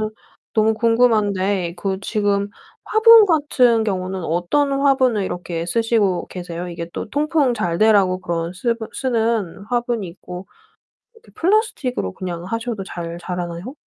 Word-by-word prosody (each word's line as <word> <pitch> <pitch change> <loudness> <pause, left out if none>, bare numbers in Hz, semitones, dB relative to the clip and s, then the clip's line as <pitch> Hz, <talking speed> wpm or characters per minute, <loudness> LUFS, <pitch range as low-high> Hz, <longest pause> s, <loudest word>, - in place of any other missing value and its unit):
그러면은 215 0 -2 0.4
너무 220 0 +3
궁금한데 205 -6 +1
그 190 +1 -2
지금 200 -1 0 0.4
화분 445 0 +7
같은 255 - +3
경우는 185 -2 -3
어떤 175 - 0
화분을 265 -6 +2
이렇게 175 -2 -4
쓰시고 215 -2 +1
계세요? 175 -1 -6
이게 170 -1 -6
또 - - -5
통풍 290 -2 +1
잘되라고 195 -1 +2
그런 170 -1 -3
쓰버 230 +3 -2
쓰는 225 -7 -1
화분이 240 -4 -1
있고 180 +1 -9 0.7
이렇게 455 0 -21
플라스틱으로 330 - 0
그냥 175 -2 -5
하셔도 230 0 -3
잘 170 -2 -6
자라나요? 175 +5 -5
210 Hz, 315 characters per minute, -20 LUFS, 180-245 Hz, 0.7 s, 화분